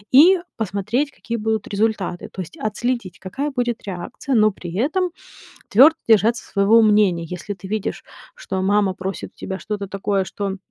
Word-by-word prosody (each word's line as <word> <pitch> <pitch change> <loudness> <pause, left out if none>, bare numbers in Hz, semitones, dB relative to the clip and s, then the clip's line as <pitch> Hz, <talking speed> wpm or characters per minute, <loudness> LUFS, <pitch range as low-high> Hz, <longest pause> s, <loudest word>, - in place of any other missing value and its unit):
и 355 +7 +8 0.2
посмотреть, 220 +7 -1
какие 235 -2 -5
будут 220 -1 -1
результаты, 200 -4 -1
то 190 - -5
есть 180 - -9
отследить, 235 -4 -2
какая 270 +11 -4
будет 240 -3 -2
реакция, 190 +8 -5
но 215 -1 +5
при 175 -3 -8
этом 325 - 0 0.6
твердо 280 +9 +7
держаться 225 +2 +4
своего 205 +3 +4
мнения. 205 -6 +3
Если 180 +4 -6
ты 190 0 -10
видишь, 215 -1 -3 0.3
что 190 -1 -4
мама 200 -1 +2
просит 190 +1 -6
тебя 190 0 -5
что-то 205 -2 -4
такое, 195 0 -1
что 200 0 -4
210 Hz, 155 wpm, -21 LUFS, 190-235 Hz, 0.6 s, и